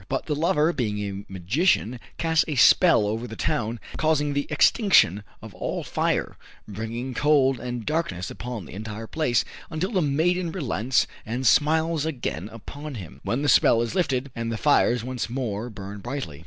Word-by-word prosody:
But 135 0 -2
the 155 - -1
lover 155 +1 +2
being 110 -8 -2
a 100 -1 -5
magician, 120 - +1 0.2
casts 160 -1 +2
a 150 - -2
spell 155 - +6
over 110 +4 -2
the 110 - -8
town, 115 +1 -1 0.2
causing 150 -2 +1
the 140 0 -1
extinction 150 - +4 0.2
of - - -10
all - - -4
fire, - - -1 0.3
bringing 115 +5 -5
cold 135 -2 +3
and 120 -2 -5
darkness 150 - -2
upon 120 -6 -6
the - - -11
entire 110 +2 -6
place, 125 -3 0 0.2
until 170 +5 -2
the 190 -5 +1
maiden 165 +4 +1
relents 130 - 0 0.2
and 120 +4 -4
smiles 160 +4 +3
again 120 - -3
upon 145 +6 -8
him, 80 - -9
when 130 +5 -1
the - - +1
spell 115 -3 +5
is 115 - -4
lifted 140 -7 0
and 115 0 -3
the 115 - -2
fires 125 -3 +3
once 125 -2 -4
more 120 -3 -3
burn 100 -1 -8
brightly. 120 - -5
125 Hz, 170 wpm, -25 LUFS, 110-150 Hz, 0.3 s, spell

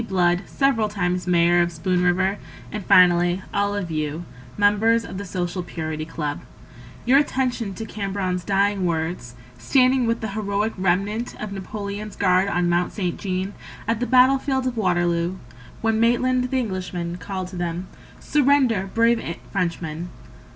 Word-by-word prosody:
Blood, 180 -2 +2
several 235 -6 +1
times 180 -3 -1
Mayor 175 0 +4
of 175 0 0
Spoon 180 +2 0
River; 185 +3 +1 0.3
And 210 -2 -5
finally 180 -1 +4
all 200 0 +1
of 185 -5 -3
you, 155 +2 -3 0.3
members 215 +3 +3
of 190 - -7
the 200 - -5
Social 180 0 -3
Purity 155 -3 -5
Club— 150 -2 -4 0.6
Your 265 +3 +6
attention 250 -8 -1
to 225 - -5
Cambronne's 195 -4 -3
dying 200 +1 +1
words, 160 -7 -3 0.2
Standing 255 - +3
with 230 0 0
the 220 - -3
heroic 205 +1 -1
remnant 195 +5 -1
Of 215 -1 -5
Napoleon's 200 +1 -6
guard 185 0 +3
on 175 -3 +1
Mount 175 +1 +1
Saint 180 -5 -2
Jean 190 0 -3 0.3
At 230 -1 0
the 245 - -1
battle 260 +1 +5
field 265 -1 -1
of 255 -1 -1
Waterloo, 175 -3 0 0.4
When 225 -1 +1
Maitland, 250 +2 +2
the 265 - 0
Englishman, 180 -6 -3
called 185 -1 -5
to 185 - -10
them: 175 +1 -3 0.3
"Surrender, 265 -9 +2
brave 230 -7 +1
Frenchmen!" 170 -2 -3
195 Hz, 150 wpm, -23 LUFS, 175-225 Hz, 0.6 s, Your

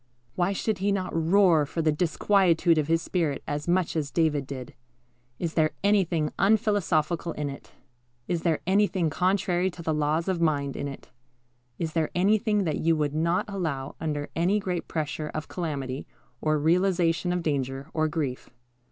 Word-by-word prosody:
Why 175 +6 +1
should 200 0 -1
he 200 +2 +1
not 190 -3 -2
roar 165 -1 +4
for 165 +3 -2
the 155 - +3
disquietude 170 0 +3
of 150 - -1
his 165 0 +1
spirit 165 -7 -1
as 145 +2 -4
much 175 -1 +1
as 150 -3 -1
David 145 -1 +1
did? 130 -3 -7 0.6
Is 170 -2 -3
there 155 -1 +2
anything 180 -7 +2
unphilosophical 180 -6 +2
in 145 -1 -3
it? 140 - -11 0.6
Is 175 -2 -1
there 165 -3 +1
anything 190 -3 +2
contrary 185 +1 +1
to 175 -1 -10
the 160 - 0
laws 150 +3 0
of 185 -3 0
mind 140 -4 +1
in 140 - -3
it? 140 -2 -9 0.7
Is 160 -2 -3
there 160 -2 +1
anything 210 +3 +2
that 160 -4 -1
you 165 0 +2
would 150 -2 -1
not 170 +3 +1
allow 160 -9 -3
under 150 -2 -3
any 180 +5 +2
great 180 -3 -3
pressure 155 -1 -3
of 155 0 -4
calamity, 140 -6 -4 0.3
or 155 0 +2
realization 175 +1 +2
of 180 -1 -1
danger, 135 -3 -2
or 155 -1 +1
grief? 150 -5 -3
165 Hz, 170 wpm, -27 LUFS, 150-185 Hz, 0.7 s, roar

